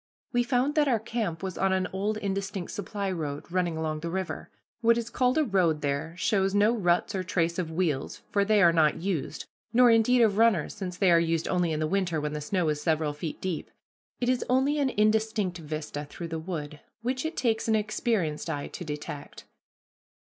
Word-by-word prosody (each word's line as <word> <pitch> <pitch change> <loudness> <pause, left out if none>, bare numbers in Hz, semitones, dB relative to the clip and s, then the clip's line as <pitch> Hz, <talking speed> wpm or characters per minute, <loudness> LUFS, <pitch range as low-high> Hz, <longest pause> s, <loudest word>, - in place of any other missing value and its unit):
We 245 - +3
found 250 +3 +1
that 300 -1 +3
our 245 -4 +3
camp 215 -6 -3
was 190 -2 -4
on 195 0 +2
an 185 -1 +1
old 205 +3 -1
indistinct 195 -2 -3
supply 200 -1 -3
road, 150 -5 -4
running 175 -3 0
along 155 -1 -2
the 170 +2 -4
river. 190 +1 -4 0.3
What 230 0 +4
is 235 0 -3
called 255 +2 +2
a 310 - +4
road 180 - +2
there 145 +3 -2
shows 195 0 +1
no 210 +3 +4
ruts 180 -2 +1
or 190 -1 -1
trace 170 -1 0
of 170 -3 -2
wheels, 160 -5 -2
for 200 - +3
they 210 0 +4
are 170 -1 +6
not 155 -3 +4
used; 165 -5 -3 0.3
nor, 245 0 +6
indeed, 230 +2 +5
of 205 -3 +3
runners, 225 -9 +3
since 180 -2 -6
they 190 -2 +4
are 170 - +6
used 165 -1 0
only 180 -2 +1
in 155 - -1
the 155 - +1
winter 175 -1 0
when 150 0 -3
the 150 - -3
snow 175 +3 0
is 150 -1 -1
several 155 -2 +1
feet 150 +1 -5
deep. 185 -4 -3 0.5
It 245 - -1
is 255 0 +2
only 270 +4 +2
an 275 -2 +2
indistinct 215 -4 +1
vista 150 -1 -5
through 165 +3 -7
the 160 0 -3
wood, 155 -3 -5 0.2
which 255 +2 -1
it 320 +1 -4
takes 225 -3 +1
an 220 - +3
experienced 210 -7 -1
eye 145 -3 -3
to - - -7
detect. 150 -2 -7
185 Hz, 205 wpm, -28 LUFS, 160-220 Hz, 0.5 s, are